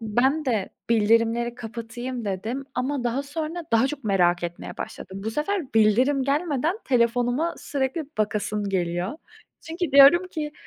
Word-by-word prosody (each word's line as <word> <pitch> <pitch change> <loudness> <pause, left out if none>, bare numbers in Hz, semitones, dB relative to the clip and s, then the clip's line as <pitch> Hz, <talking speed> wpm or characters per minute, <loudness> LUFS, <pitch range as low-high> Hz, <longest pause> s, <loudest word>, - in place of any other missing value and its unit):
ben 255 +8 +1
de 225 -8 0 0.2
bildirimleri 230 +2 +2
kapatayım 240 +1 -6
dedim. 220 +8 -3
Ama 255 +1 -2
daha 245 +3 0
sonra 315 +4 -5
daha 230 +3 +4
çok 280 -1 -6
merak 175 -4 +2
etmeye 175 0 -6
başladım. 190 +1 -7
Bu 220 - -1
sefer 300 - -2
bildirim 245 +6 +4
gelmeden 300 - 0
telefonuma 245 +5 +1
sürekli 275 +3 -2
bakasım 210 -1 -1
geliyor. 175 0 -1 0.5
Çünkü 330 -1 -4
diyorum 290 +7 +7
ki, 300 -4 -4
245 Hz, 135 wpm, -24 LUFS, 220-285 Hz, 0.5 s, diyorum